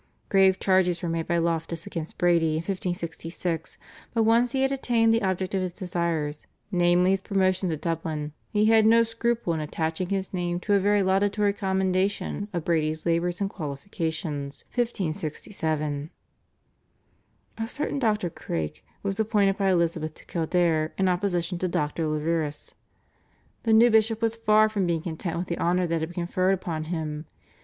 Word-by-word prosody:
Grave 190 -1 +4
charges 185 -2 +2
were 170 - -1
made 165 0 -2
by 170 - +1
Loftus 165 0 -1
against 165 -2 -6
Brady 170 -3 +3
in 160 +1 -1
1566, 170 -2 -4 0.4
but 225 - +3
once 230 +2 +4
he 265 -1 +1
had 270 - +2
attained 235 -4 +2
the 230 - +2
object 185 -1 -1
of 190 - +1
his 185 -1 -2
desires, 170 -5 -2 0.2
namely 175 0 +4
his 195 0 +1
promotion 185 -2 +1
to 160 - -1
Dublin, 155 -2 -3 0.2
he 210 -1 +2
had 220 0 +5
no 230 +1 +6
scruple 230 -4 -1
in 160 - -2
attaching 160 +3 -2
his 195 -1 -2
name 175 -1 -1
to 205 - 0
a 200 - +5
very 205 +1 +3
laudatory 200 +2 +2
commendation 190 +1 0
of 170 -4 -3
Brady's 155 -2 0
labours 170 +1 +1
and 200 - +2
qualifications 155 -3 -4
(1567). 155 - -2 1.5
A 225 - -1
certain 290 +1 -2
Dr. 210 -8 +1
Craik 85 - -4 0.2
was 200 +1 -2
appointed 210 -3 +2
by 195 -1 +1
Elizabeth 165 -3 0
to - - -16
Kildare 165 -2 +1
in 190 - +2
opposition 180 -1 -1
to 185 - 0
Dr. 155 -1 -1
Leverous. 155 -1 -2 0.9
The 225 - 0
new 230 +2 +7
bishop 220 0 +3
was 225 0 +1
far 215 -1 +4
from 205 -4 -1
being 165 -2 0
content 170 0 -4
with 175 - -2
the 170 - -3
honour 180 +1 +2
that 165 -1 0
had 160 +1 -3
been 175 0 -3
conferred 185 +2 +2
upon 165 -4 -4
him. 155 -2 -4
180 Hz, 165 wpm, -26 LUFS, 165-200 Hz, 1.5 s, new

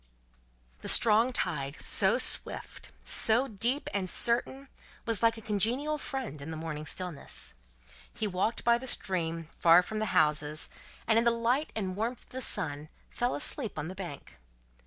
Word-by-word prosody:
The - - -8
strong 225 +3 +6
tide, 140 - -3
so - - +2
swift, - - -3
so 235 +5 +4
deep, 240 +5 -1
and 190 -2 -1
certain, 255 +6 0 0.4
was 230 -4 +1
like 230 -1 +3
a - - -9
congenial 245 +9 0
friend, 260 - -5
in 140 - -7
the 160 - -5
morning 155 -1 -6
stillness. 180 -4 -6 0.6
He 220 - -4
walked 200 +3 -1
by 235 0 +3
the 260 - -8
stream, 165 -7 -2
far 170 +1 +6
from 215 +4 -5
the 215 - -1
houses, 150 0 +1 0.3
and 225 0 +3
in - - +1
the 235 - +4
light 235 +6 0
and 190 -4 -3
warmth 230 +4 -3
of - - -28
the 260 - -6
sun 150 - -1 0.2
fell 245 +1 -1
asleep 275 - +2
on 155 +2 -4
the - - -6
bank. 180 -7 -9
215 Hz, 165 wpm, -29 LUFS, 165-235 Hz, 0.6 s, strong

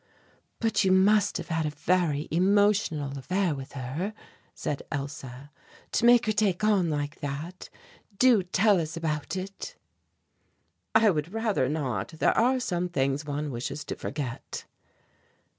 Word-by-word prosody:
"But 225 -2 +2
you 190 - +3
must 205 +2 +4
have 170 - -7
had 160 -1 0
a 150 - -5
very 160 -2 +1
emotional 185 -5 +2
affair 180 +4 0
with 135 -1 -8
her," 140 - -4 0.4
said 145 - -3
Elsa, 140 -1 -6 0.4
"to - - +1
make 240 -1 +6
her 215 - +2
take 210 -3 +1
on 200 -5 +3
like 145 -1 -3
that. 145 +6 -6 0.5
Do 250 -4 +5
tell 190 +2 +3
us 160 +1 -5
about 155 0 -2
it." 195 +1 -6 1.2
"I 220 -1 +6
would 155 0 -2
rather 215 - 0
not; 130 -10 -2
there - - +3
are 255 +3 +3
some 180 -7 -1
things 140 -2 0
one 145 0 -3
wishes 130 +4 -4
to - - -4
forget." 135 -4 -5
165 Hz, 140 wpm, -27 LUFS, 145-200 Hz, 1.2 s, make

